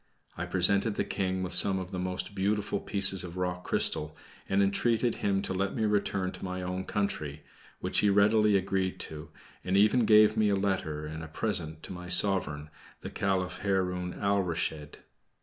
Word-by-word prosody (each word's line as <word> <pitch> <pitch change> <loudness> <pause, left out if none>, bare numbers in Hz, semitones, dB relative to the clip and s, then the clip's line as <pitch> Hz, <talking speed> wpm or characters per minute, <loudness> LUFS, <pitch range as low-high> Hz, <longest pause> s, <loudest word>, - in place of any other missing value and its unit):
I 85 +1 -4
presented 100 +4 +2
the - - 0
King 95 -1 -2
with 90 - -3
some 95 -1 +3
of 95 0 -5
the 95 - -4
most 90 +1 -3
beautiful 100 +1 -1
pieces 100 -2 +1
of 90 0 -8
rock 90 0 -2
crystal, 75 +1 0 0.3
and 100 +1 +3
entreated 115 +4 +1
him 100 -1 0
to - - -2
let 95 +5 -1
me 110 -3 0
return 100 -3 0
to - - -10
my 90 -1 -4
own 90 +1 -3
country, 75 -8 -3 0.4
which - - 0
he 105 - +3
readily 105 +1 +4
agreed 95 -1 -1
to, 75 -1 -7 0.3
and 95 +1 +1
even 110 +4 +4
gave 105 0 +6
me 110 -1 +3
a 100 - +2
letter 95 -6 -1
and 80 +1 -6
a - - -7
present 80 -3 -3
to - - -6
my 90 0 -8
sovereign, 90 -5 +1 0.3
the - - -7
Caliph 95 -2 -1
Haroun 90 -2 -1
Alrashid. 85 -6 -1
95 Hz, 180 wpm, -29 LUFS, 90-100 Hz, 0.4 s, gave